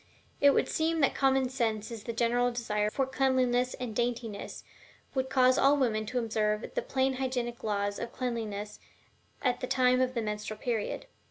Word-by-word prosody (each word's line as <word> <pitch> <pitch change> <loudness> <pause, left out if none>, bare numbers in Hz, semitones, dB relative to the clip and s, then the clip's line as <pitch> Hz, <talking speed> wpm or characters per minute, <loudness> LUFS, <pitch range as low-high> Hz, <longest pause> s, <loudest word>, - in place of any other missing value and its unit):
It 285 -1 +6
would - - +2
seem 320 0 0
that 275 - +3
common 270 -1 +2
sense 230 -4 -1
and 230 - -5
the 235 - -4
general 240 +1 +2
desire 210 -3 -1
for 270 +5 0
cleanliness 255 -2 +1
and 240 -4 -5
daintiness 235 -3 -3 0.5
would 260 -1 -1
cause 255 -1 +4
all 280 +2 +5
women 215 -5 0
to 250 - -3
observe 215 -2 0
the - - 0
plain 265 0 0
hygienic 245 -2 -2
laws 205 -1 -1
of 235 - -5
Cleanliness 220 -5 -4 0.6
at 250 -2 +1
the 255 - -3
time 255 0 +3
of 255 0 0
the 230 - 0
menstrual 210 0 -4
period. 230 - -2
245 Hz, 175 wpm, -30 LUFS, 220-260 Hz, 0.6 s, It